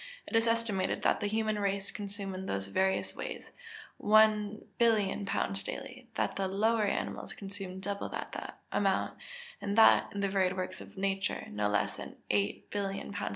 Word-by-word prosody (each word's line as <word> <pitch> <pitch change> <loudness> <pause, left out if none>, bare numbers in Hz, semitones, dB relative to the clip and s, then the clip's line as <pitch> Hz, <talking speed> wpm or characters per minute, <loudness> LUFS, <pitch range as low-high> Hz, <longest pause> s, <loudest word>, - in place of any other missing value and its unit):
It - - -4
is 225 +1 +4
estimated 230 -5 +1
that - - +3
the 205 - 0
human 215 0 0
race 200 -1 -1
consume 200 -1 -5
in 190 +1 -5
those 95 0 -2
various 190 - +1
ways - - -6 0.5
1,000,000,000 215 0 +3
lbs. 195 0 -1
daily; 255 -2 -7
that - - 0
the 195 -1 +1
lower 215 +3 +2
animals 200 - -2
consume 195 -2 -6
double 200 +1 -3
that - - -6
amount; - - +1 0.4
and 200 +1 -2
that, 225 - +7
in 200 - -3
the 200 - +2
varied 190 -1 +2
works 185 0 -3
of - - -12
nature, 195 0 -1
no 105 0 0
less 105 0 +1
than - - -7 0.2
8,000,000,000 195 - -1
lbs. - - -2
200 Hz, 160 wpm, -32 LUFS, 190-215 Hz, 0.5 s, that